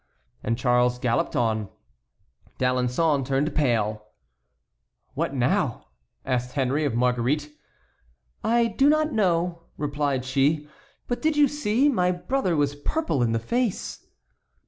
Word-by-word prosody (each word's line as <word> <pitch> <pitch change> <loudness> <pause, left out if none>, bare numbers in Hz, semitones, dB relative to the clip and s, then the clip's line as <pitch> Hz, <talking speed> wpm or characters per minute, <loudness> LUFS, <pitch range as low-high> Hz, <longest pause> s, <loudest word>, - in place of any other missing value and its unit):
And 115 +1 -1
Charles 125 0 +2
galloped 125 +7 0
on. 110 -5 0 0.9
D'Alençon 125 +4 +1
turned 140 +3 0
pale. 110 -7 0 1.1
"What - - -2
now?" - - 0 0.4
asked 125 -1 -1
Henry 140 +2 0
of 135 - -1
Marguerite. 125 +5 0 0.9
"I 235 +1 +3
do 270 +6 +3
not 310 0 +2
know," 175 -4 +1 0.2
replied 145 -3 -1
she; 145 +3 +1 0.4
"but 245 - -2
did 315 -1 +1
you 295 -1 +6
see? 270 -2 +1
My 180 -10 +2
brother 185 +1 -1
was 145 -1 +1
purple 155 - -1
in 120 -1 +2
the 115 - +1
face." 180 - -2
145 Hz, 125 wpm, -25 LUFS, 125-185 Hz, 1.1 s, you